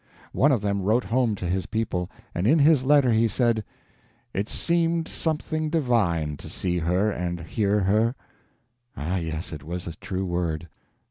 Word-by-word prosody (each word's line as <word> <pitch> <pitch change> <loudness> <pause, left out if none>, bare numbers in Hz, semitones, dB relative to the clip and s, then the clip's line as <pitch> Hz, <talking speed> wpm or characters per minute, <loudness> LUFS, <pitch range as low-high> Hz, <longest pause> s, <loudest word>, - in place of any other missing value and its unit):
One 145 +3 +3
of 125 -6 +2
them 100 -1 0
wrote 110 +6 +2
home 120 -2 +1
to 95 - -6
his 95 +1 -1
people, 105 -6 -2 0.2
and 90 +4 0
in 155 +7 +5
his 150 -2 +5
letter 140 -2 +4
he 115 +1 +4
said, 115 -1 +1 0.7
"It 100 +3 -2
seemed 170 -1 +1
something 155 0 -2
divine 100 - +1
to - - -10
see 90 -1 -1
her 90 +6 +1
and 85 -2 -3
hear 100 +4 0
her." 110 +6 +2 0.8
Ah, 85 +6 -1
yes, 80 0 -4
and 75 -3 -6
it - - -15
was 90 +1 -4
a 85 - -5
true 95 0 -3
word. 85 -2 -2
105 Hz, 175 wpm, -25 LUFS, 90-125 Hz, 0.8 s, in